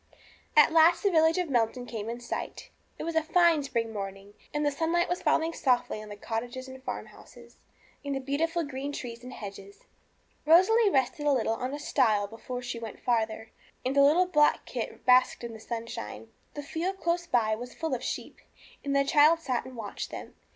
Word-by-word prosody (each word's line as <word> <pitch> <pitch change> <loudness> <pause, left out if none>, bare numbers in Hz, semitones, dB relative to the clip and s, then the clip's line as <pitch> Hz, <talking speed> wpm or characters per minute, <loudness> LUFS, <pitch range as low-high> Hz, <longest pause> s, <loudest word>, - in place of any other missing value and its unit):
At 300 - +7
last 330 +1 +5
the 400 - +3
village 320 0 +4
of 360 -2 0
Melton 245 -2 0
came 225 -2 -5
in 235 +1 -5
sight. 240 - -6 0.3
It - - -5
was 335 0 -3
a 320 - +4
fine 330 0 +4
spring 235 -5 -2
morning, 195 0 -7 0.2
and 295 0 -1
the 290 - +2
sunlight 330 +4 +1
was 355 - -2
falling 325 +1 +1
softly 245 -6 0
on 215 - -10
the 205 - -7
cottages, 240 +5 -5
and 260 0 -10
farmhouses, - - -9 0.5
and 280 -1 -2
the - - -1
beautiful 320 +5 -1
green 285 0 -5
trees 240 -3 -7
and 250 - -8
hedges. 200 -2 -10 0.6
Rosalie 385 +8 +5
rested 295 +1 0
a - - +5
little 235 -4 +1
on 255 +3 -3
a - - -7
stile 225 -8 +2
before 240 +4 -7
she 240 -1 -4
went 225 -2 -8
farther, 225 -2 -1 0.3
and 260 +2 0
the 280 - +6
little 310 +6 +5
black 300 -5 +3
kit - - -6
basked 255 -1 +4
in 235 -1 -5
the 220 - -10
sunshine. 230 0 -6 0.3
The 290 - -5
field 355 +7 -3
close 345 0 -1
by 225 -7 +2
was 245 +3 -6
full 320 -4 -3
of 250 - -3
sheep, - - -5 0.4
and 280 0 -1
the 275 0 +3
child 300 +3 +5
sat 255 -7 -2
and 260 - -10
watched 210 -3 -5
them. - - -8
265 Hz, 200 wpm, -28 LUFS, 230-320 Hz, 0.6 s, At